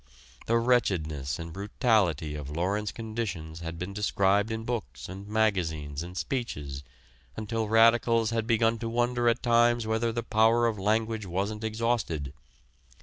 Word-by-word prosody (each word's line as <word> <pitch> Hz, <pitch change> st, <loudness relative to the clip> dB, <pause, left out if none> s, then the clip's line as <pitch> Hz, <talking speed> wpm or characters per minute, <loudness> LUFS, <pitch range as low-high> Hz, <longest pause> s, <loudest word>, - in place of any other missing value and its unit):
The 115 Hz, -, +3 dB
wretchedness 80 Hz, -, +1 dB
and 85 Hz, -1 st, -7 dB
brutality 100 Hz, -, +1 dB
of 75 Hz, -2 st, -6 dB
Lawrence 95 Hz, +7 st, -1 dB
conditions 100 Hz, -9 st, -5 dB
had 85 Hz, 0 st, -6 dB
been 90 Hz, +3 st, -5 dB
described 100 Hz, 0 st, +2 dB
in 110 Hz, 0 st, -3 dB
books 70 Hz, -, -4 dB
and 95 Hz, +2 st, -8 dB
magazines 85 Hz, -9 st, 0 dB
and 90 Hz, +1 st, -7 dB
speeches 75 Hz, -, -4 dB, 0.5 s
until 110 Hz, 0 st, -2 dB
radicals 115 Hz, 0 st, +4 dB
had 115 Hz, -1 st, -1 dB
begun 115 Hz, 0 st, +2 dB
to 115 Hz, 0 st, -3 dB
wonder 120 Hz, +1 st, +1 dB
at 115 Hz, -, 0 dB
times 120 Hz, -1 st, +3 dB
whether 110 Hz, +1 st, 0 dB
the 115 Hz, +1 st, -3 dB
power 115 Hz, +2 st, +3 dB
of 110 Hz, -3 st, 0 dB
language 110 Hz, +1 st, 0 dB
wasn't 100 Hz, +5 st, -2 dB
exhausted. 110 Hz, -, -1 dB
110 Hz, 145 wpm, -28 LUFS, 85-115 Hz, 0.5 s, radicals